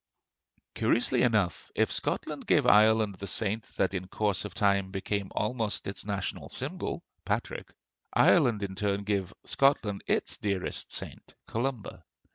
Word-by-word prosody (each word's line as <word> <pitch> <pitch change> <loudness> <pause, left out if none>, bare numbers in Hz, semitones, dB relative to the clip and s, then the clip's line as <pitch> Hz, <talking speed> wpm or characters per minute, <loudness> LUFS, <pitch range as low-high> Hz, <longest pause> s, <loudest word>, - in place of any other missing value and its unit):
Curiously 120 - +2
enough, 105 -7 +1
if - - +2
Scotland - - -2
gave - - +4
Ireland 110 -1 +5
the 100 - -5
saint 110 +3 0
that 95 - +1
in 95 -1 -3
course 105 +1 -1
of 105 - -7
time 100 -2 +2
became 100 +1 -3
almost 110 -1 -1
its 100 - -2
national 100 -2 -3
symbol, - - -4 0.2
Patrick, - - -3 0.4
Ireland 110 -4 +4
in 95 -1 -3
turn 100 0 -1
gave 100 -2 -1
Scotland 115 -8 +2
its - - 0
dearest 100 -3 -3
saint, - - -7
Columba. 115 -7 -3
100 Hz, 135 wpm, -29 LUFS, 95-110 Hz, 0.4 s, Ireland